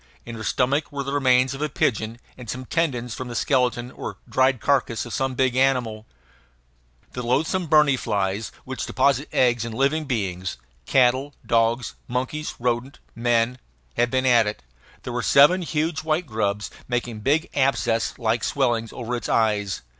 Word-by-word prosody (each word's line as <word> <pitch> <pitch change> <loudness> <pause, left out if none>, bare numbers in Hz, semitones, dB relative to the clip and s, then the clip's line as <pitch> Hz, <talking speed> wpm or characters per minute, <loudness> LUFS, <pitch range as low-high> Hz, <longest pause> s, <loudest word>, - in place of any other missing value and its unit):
In 115 - -7
her 115 - -7
stomach 140 +6 0
were 140 -1 -3
the 140 +1 -4
remains 130 -2 +3
of 135 - -7
a 150 - 0
pigeon 115 -3 -1 0.2
and 125 -3 -10
some 130 +2 -5
tendons 125 -7 -1
from 130 - -6
the 120 - -6
skeleton 125 -2 +1
or - - -7
dried 130 -1 +2
carcass 125 -2 +1
of 120 - -7
some 135 -1 -1
big 130 -1 +1
animal. 125 -5 +1 1.0
The 125 - -5
loathsome 160 +9 0
berni 150 -2 +5
flies, 100 -2 -2
which 130 0 -4
deposit 140 +1 +1
eggs 120 -3 +2
in 115 -1 -5
living 140 +6 +1
beings 95 -8 -3 0.3
cattle, 130 +2 +3
dogs, 115 +1 +1
monkeys, 130 +5 -3
rodents, 120 +2 -2 0.2
men 120 +1 +1 0.3
had 120 0 +1
been 130 +1 0
at 120 -4 +5
it. 105 -11 -5 0.4
There 125 - -5
were 125 - -1
seven 145 +10 +5
huge, 160 -1 -1
white 160 +2 0
grubs 105 -4 -2 0.2
making 120 -2 -2
big 145 +9 +1
abscess 130 -4 +1
like 115 -1 0
swellings 120 -5 0
over 120 0 -4
its 120 - -4
eyes. 105 - +1
125 Hz, 165 wpm, -23 LUFS, 115-135 Hz, 1.0 s, berni